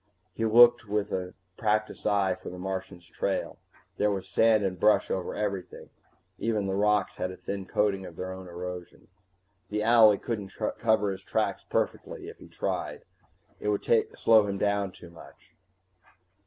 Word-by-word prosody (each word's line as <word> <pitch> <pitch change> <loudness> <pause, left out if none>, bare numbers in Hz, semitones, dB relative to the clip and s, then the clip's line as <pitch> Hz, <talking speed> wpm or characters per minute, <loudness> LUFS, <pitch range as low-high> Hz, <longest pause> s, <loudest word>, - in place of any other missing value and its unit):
He - - -3
looked 120 0 +6
with 105 0 -1
a 90 -1 -3 0.2
practiced 110 -1 0
eye 100 -3 +2
for - - -9
the 90 - -8
Martian's 95 -1 -5
trail. - - -3 0.4
There 105 - +2
was 95 -2 -3
sand 110 +3 +3
and 95 -2 -2
brush 105 +2 +3
over 95 -2 -2
everything, 100 -3 -4 0.5
even 110 -3 0
the 95 - -1
rocks 105 0 +1
had 90 - -2
a 95 - -9
thin 100 -1 -5
coating 100 -2 +1
of 85 - -11
their 95 +2 -5
own 95 0 -8
erosion. 90 0 -8 0.6
The 105 0 -1
owlie 110 -2 +6
couldn't 105 -5 -4 0.3
cover 110 -3 +2
his 95 0 -6
tracks 110 +3 -1
perfectly 470 -6 -2
if 450 - -13
he - - -13
tried, - - -4 0.6
it - - -5
would - - -1 0.3
slow 110 -2 +5
him 100 -1 -2 0.3
too 85 -2 -14
much. 85 - -16
100 Hz, 160 wpm, -28 LUFS, 95-110 Hz, 0.6 s, looked